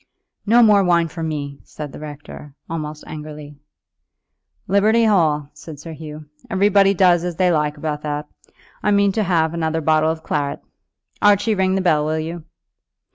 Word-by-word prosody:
"No 235 Hz, +3 st, +6 dB
more 205 Hz, -3 st, +5 dB
wine 170 Hz, -2 st, +2 dB
for 165 Hz, -, -8 dB
me," 145 Hz, -3 st, -4 dB
said 150 Hz, -2 st, -8 dB
the -, -, -10 dB
rector, 145 Hz, -1 st, -10 dB
almost 155 Hz, -2 st, -5 dB
angrily. 150 Hz, -1 st, -9 dB, 1.1 s
"Liberty 215 Hz, +4 st, +3 dB
Hall," 155 Hz, -8 st, +2 dB
said 150 Hz, -1 st, -11 dB
Sir 165 Hz, +2 st, -9 dB
Hugh; 155 Hz, -1 st, -9 dB, 0.2 s
"everybody 195 Hz, 0 st, +3 dB
does 175 Hz, -2 st, +4 dB
as 175 Hz, -1 st, -3 dB
they 180 Hz, +1 st, +2 dB
like 150 Hz, -2 st, 0 dB
about 150 Hz, 0 st, -4 dB
that. 150 Hz, 0 st, -4 dB, 0.5 s
I -, -, 0 dB
mean 200 Hz, -1 st, +3 dB
to 220 Hz, -, -1 dB
have 170 Hz, -4 st, +1 dB
another 160 Hz, -1 st, -1 dB
bottle 155 Hz, 0 st, +2 dB
of 160 Hz, 0 st, -4 dB
claret. 145 Hz, -1 st, -2 dB, 0.6 s
Archie, 205 Hz, +2 st, +4 dB
ring 190 Hz, -1 st, +1 dB
the 195 Hz, -, 0 dB
bell, 155 Hz, -5 st, +2 dB
will 155 Hz, +1 st, -1 dB
you?" 160 Hz, +1 st, -5 dB
160 Hz, 165 wpm, -20 LUFS, 150-190 Hz, 1.1 s, No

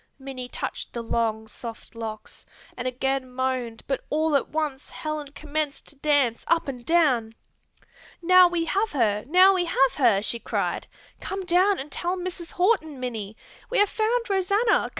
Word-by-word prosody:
Minnie 265 Hz, -2 st, -7 dB
touched -, -, -5 dB
the 235 Hz, -, -4 dB
long, 220 Hz, -1 st, -1 dB
soft 230 Hz, +1 st, -9 dB
locks 220 Hz, -2 st, -7 dB, 0.3 s
and 250 Hz, 0 st, -3 dB
again 260 Hz, +1 st, -1 dB
moaned 250 Hz, -3 st, -2 dB
but 270 Hz, -, -2 dB
all 310 Hz, 0 st, +1 dB
at 280 Hz, -, +1 dB
once 300 Hz, -3 st, -3 dB
Helen 305 Hz, -1 st, -4 dB
commenced 300 Hz, -1 st, -3 dB
to 290 Hz, -, -13 dB
dance 280 Hz, -5 st, +2 dB
up 335 Hz, -1 st, +2 dB
and 250 Hz, -3 st, -5 dB
down. 255 Hz, -9 st, +2 dB, 0.8 s
"Now 365 Hz, +1 st, +7 dB
we 345 Hz, -1 st, -1 dB
have 400 Hz, +6 st, 0 dB
her, 210 Hz, -6 st, +1 dB
now 370 Hz, +5 st, +7 dB
we 365 Hz, -2 st, +1 dB
have 270 Hz, -5 st, +3 dB
her!" 230 Hz, -8 st, +4 dB
she 235 Hz, +2 st, -1 dB
cried. -, -, -2 dB, 0.3 s
"Come 385 Hz, 0 st, -4 dB
down 365 Hz, +3 st, +3 dB
and 280 Hz, +2 st, -7 dB
tell 350 Hz, +5 st, -2 dB
Mrs. 360 Hz, -2 st, -6 dB
Horton, 355 Hz, -, +1 dB
Minnie! 220 Hz, -4 st, -5 dB, 0.3 s
We -, -, 0 dB
have 410 Hz, -1 st, +5 dB
found 465 Hz, +2 st, 0 dB
Rosanna! 400 Hz, +3 st, +2 dB
290 Hz, 165 wpm, -25 LUFS, 245-355 Hz, 0.8 s, Now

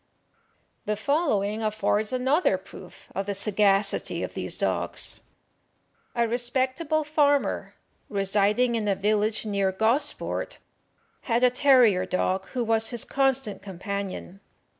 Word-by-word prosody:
The 210 Hz, -, -1 dB
following 215 Hz, -, 0 dB
affords 215 Hz, 0 st, 0 dB
another 260 Hz, +7 st, +2 dB
proof -, -, -14 dB
of 195 Hz, 0 st, -3 dB
the 200 Hz, -, -2 dB
sagacity 200 Hz, 0 st, +1 dB
of -, -, -5 dB
these -, -, -3 dB
dogs: -, -, 0 dB, 1.0 s
A 235 Hz, -1 st, +2 dB
respectable 260 Hz, +6 st, 0 dB
farmer, 290 Hz, -2 st, +1 dB, 0.3 s
residing 205 Hz, +4 st, +2 dB
in 220 Hz, -2 st, -1 dB
a 200 Hz, -, +2 dB
village 210 Hz, +3 st, 0 dB
near 200 Hz, -2 st, 0 dB
Gosport, 280 Hz, -, -1 dB, 0.7 s
had 235 Hz, +2 st, +2 dB
a 250 Hz, -, +5 dB
terrier 250 Hz, -8 st, +4 dB
dog 190 Hz, +1 st, -1 dB
who 250 Hz, -2 st, -3 dB
was 225 Hz, 0 st, +1 dB
his 240 Hz, -3 st, -2 dB
constant 270 Hz, -5 st, 0 dB
companion. 195 Hz, 0 st, -6 dB
220 Hz, 120 wpm, -26 LUFS, 200-260 Hz, 1.0 s, a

